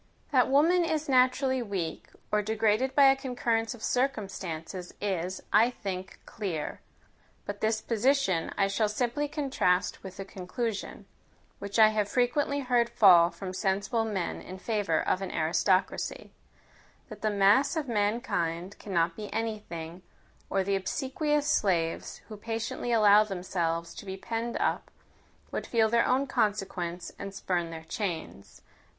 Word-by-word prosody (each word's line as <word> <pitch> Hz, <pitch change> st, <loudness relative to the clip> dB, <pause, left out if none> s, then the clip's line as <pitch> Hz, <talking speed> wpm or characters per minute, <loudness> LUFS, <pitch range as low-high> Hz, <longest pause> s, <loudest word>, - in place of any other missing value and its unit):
That 255 Hz, -3 st, +4 dB
woman 330 Hz, +6 st, +4 dB
is 315 Hz, -2 st, -1 dB
naturally 260 Hz, 0 st, +3 dB
weak, 195 Hz, -7 st, -4 dB, 0.2 s
or 210 Hz, -, +3 dB
degraded 220 Hz, +4 st, +1 dB
by 285 Hz, -, +6 dB
a -, -, +2 dB
concurrence 240 Hz, -3 st, -1 dB
of 225 Hz, -, -13 dB
circumstances 190 Hz, -, -3 dB
is, 185 Hz, -2 st, -2 dB
I 225 Hz, +3 st, +6 dB
think, 190 Hz, -6 st, -6 dB
clear. 180 Hz, -9 st, -4 dB, 0.6 s
But 205 Hz, 0 st, -6 dB
this 220 Hz, 0 st, +1 dB
position 230 Hz, -7 st, +1 dB
I 200 Hz, -, +3 dB
shall 210 Hz, +2 st, +1 dB
simply 245 Hz, +7 st, -1 dB
contrast 270 Hz, -, 0 dB
with 190 Hz, 0 st, -10 dB
a 195 Hz, -, -4 dB
conclusion, 200 Hz, +4 st, -5 dB, 0.5 s
which 200 Hz, +1 st, -4 dB
I 220 Hz, -1 st, +8 dB
have 210 Hz, -1 st, 0 dB
frequently 280 Hz, +4 st, +1 dB
heard 245 Hz, -2 st, +2 dB
fall 185 Hz, -8 st, +7 dB
from 185 Hz, +2 st, -7 dB
sensible 200 Hz, +4 st, 0 dB
men 200 Hz, -6 st, -3 dB
in 185 Hz, -, -9 dB
favour 205 Hz, -5 st, 0 dB
of 185 Hz, -, +1 dB
an 195 Hz, -, -3 dB
aristocracy: 185 Hz, +4 st, 0 dB, 0.8 s
that -, -, -10 dB
the 215 Hz, -, +1 dB
mass 205 Hz, +10 st, +4 dB
of 310 Hz, -3 st, -2 dB
mankind 205 Hz, -5 st, -1 dB
cannot 170 Hz, -4 st, 0 dB
be 210 Hz, -1 st, -7 dB
any 225 Hz, -1 st, -2 dB
thing, 170 Hz, -2 st, -8 dB, 0.5 s
or 195 Hz, -, +1 dB
the 200 Hz, +1 st, 0 dB
obsequious 290 Hz, -, -1 dB
slaves, 180 Hz, -, 0 dB
who 215 Hz, -, -8 dB
patiently 230 Hz, +2 st, -3 dB
allow 210 Hz, -2 st, +6 dB
themselves 175 Hz, -4 st, -2 dB
to -, -, -10 dB
be 190 Hz, 0 st, -5 dB
penned 230 Hz, +3 st, -3 dB
up, -, -, -1 dB, 0.6 s
would -, -, -4 dB
feel 225 Hz, -2 st, +3 dB
their 235 Hz, +1 st, +3 dB
own 260 Hz, +2 st, +2 dB
consequence, 185 Hz, -7 st, -2 dB
and 200 Hz, -1 st, -6 dB
spurn 175 Hz, -3 st, -1 dB
their 165 Hz, -1 st, -8 dB
chains. 165 Hz, -, -5 dB
210 Hz, 145 wpm, -29 LUFS, 185-240 Hz, 0.8 s, I